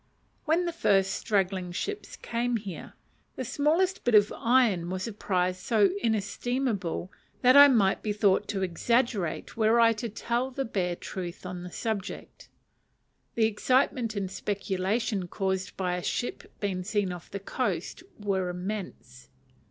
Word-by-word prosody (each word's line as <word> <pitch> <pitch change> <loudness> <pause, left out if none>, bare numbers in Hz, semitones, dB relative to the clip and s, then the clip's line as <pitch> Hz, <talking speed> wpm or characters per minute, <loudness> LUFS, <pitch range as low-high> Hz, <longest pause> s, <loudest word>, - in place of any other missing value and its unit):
When 335 +3 +2
the 345 - -2
first 195 - +2
straggling 190 -3 0
ships 415 - -4
came 240 0 -1
here, 200 -5 -8 0.4
the 260 - -4
smallest 320 +9 +1
bit 245 -2 +3
of 205 0 +5
iron 230 -8 +2
was 185 +2 -3
a 230 - -5
prize 185 -2 0
so 205 -1 +3
inestimable 220 -3 -1 0.3
that 255 +1 +7
I 285 0 +11
might 210 -8 +3
be 215 - -2
thought 205 -1 +2
to 195 -2 -2
exaggerate 205 0 0
were 225 +1 +3
I 230 -1 +6
to 230 +1 -4
tell 235 +4 -1
the 270 +1 -3
bare 180 -5 -1
truth 180 0 -7
on 180 -1 -5
the 180 0 -8
subject. 215 -2 -5 0.9
The 225 - +3
excitement 235 +1 +1
and 195 -2 -3
speculation 195 +1 -1
caused 190 0 -2
by 180 -2 0
a - - -4
ship 240 - -3
being 195 -3 -2
seen 205 -1 0
off 175 -1 -10
the 200 - -5
coast 195 - -3 0.2
were 190 -3 -1
immense. 180 -8 -6
205 Hz, 150 wpm, -28 LUFS, 185-235 Hz, 0.9 s, I